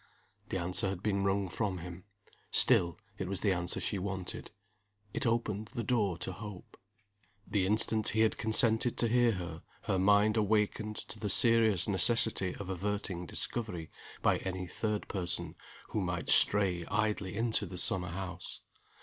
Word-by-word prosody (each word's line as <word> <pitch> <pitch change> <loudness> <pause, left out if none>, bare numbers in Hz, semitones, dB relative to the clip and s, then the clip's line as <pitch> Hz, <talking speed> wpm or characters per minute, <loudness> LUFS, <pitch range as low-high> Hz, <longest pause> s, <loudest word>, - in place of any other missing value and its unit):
The - - -2
answer 90 +3 0
had 95 0 -6
been 100 -2 0
wrung 100 0 0
from 95 +1 -3
him. 90 +2 -9 0.4
Still, 85 -1 +3 0.2
it 95 - -3
was 100 - -2
the 100 -3 +2
answer 85 -1 -2
she 100 - -2
wanted 95 -1 -5 0.6
it 145 -3 -1
opened 110 -2 -1
the 120 - -2
door 105 -9 0
to 80 - -5
hope. 105 0 -10 0.7
The 95 -3 0
instant 110 +1 +2
he 110 - 0
had 110 - +2
consented 110 +1 +2
to 120 - +1
hear 120 0 +3
her 85 -3 -7 0.2
her 95 - -1
mind 105 +3 +3
awakened 105 0 0
to 110 - -6
the 105 - -3
serious 110 -3 +4
necessity 100 -2 +3
of 100 - -8
averting 95 -1 -4
discovery 100 -9 -3 0.3
by - - +2
any 95 -1 -5
third 105 +3 -3
person 90 -3 -3 0.4
who 105 - -2
might 90 -3 -4
stray 95 -4 +6
idly 105 -2 -2
into 115 +1 +1
the 90 - -8
summer 90 0 +3
house. 90 -1 -7
100 Hz, 160 wpm, -31 LUFS, 90-110 Hz, 0.7 s, stray